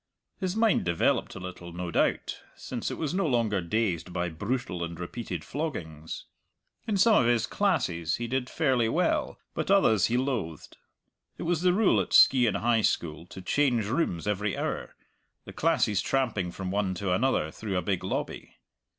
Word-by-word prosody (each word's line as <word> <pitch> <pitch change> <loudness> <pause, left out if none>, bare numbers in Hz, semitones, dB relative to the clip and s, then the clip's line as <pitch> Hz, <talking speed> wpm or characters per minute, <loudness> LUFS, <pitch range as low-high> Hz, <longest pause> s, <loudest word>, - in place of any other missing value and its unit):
His 185 -1 -2
mind 225 -1 +3
developed 85 -2 +1
a - - -6
little, 90 -1 -8
no 90 0 -4
doubt, - - 0 0.2
since - - -4
it - - -5
was 155 -1 -2
no 190 -2 +1
longer 115 -7 +1
dazed 90 -2 -1
by 90 0 -1
brutal 100 +1 -3
and 85 0 -6
repeated 90 -2 -5
floggings. 80 - -5 0.6
In 210 -3 +1
some 215 +3 +5
of 120 - +2
his 120 -2 +3
classes 115 - 0
he 120 - -4
did 125 +1 -2
fairly 130 -7 +1
well, - - 0 0.2
but - - -3
others 110 - +4
he 120 - +1
loathed. 115 - -3 0.6
It - - -5
was 170 -1 0
the 180 0 +4
rule 205 +3 +3
at - - -5
Skeighan 125 -4 +6
High 115 -1 +2
School 85 -4 -1
to 95 - -10
change 125 -1 +2
rooms 110 - -1
every 105 -1 -1
hour, - - -3 0.5
the - - -9
classes 105 -2 +2
tramping 110 -10 0
from 95 +1 -5
one 100 -2 0
to 90 +1 -2
another 90 -7 +1
through 100 -1 -4
a 90 - -1
big 90 -1 -1
lobby. 95 - -4
110 Hz, 175 wpm, -28 LUFS, 90-135 Hz, 0.6 s, Skeighan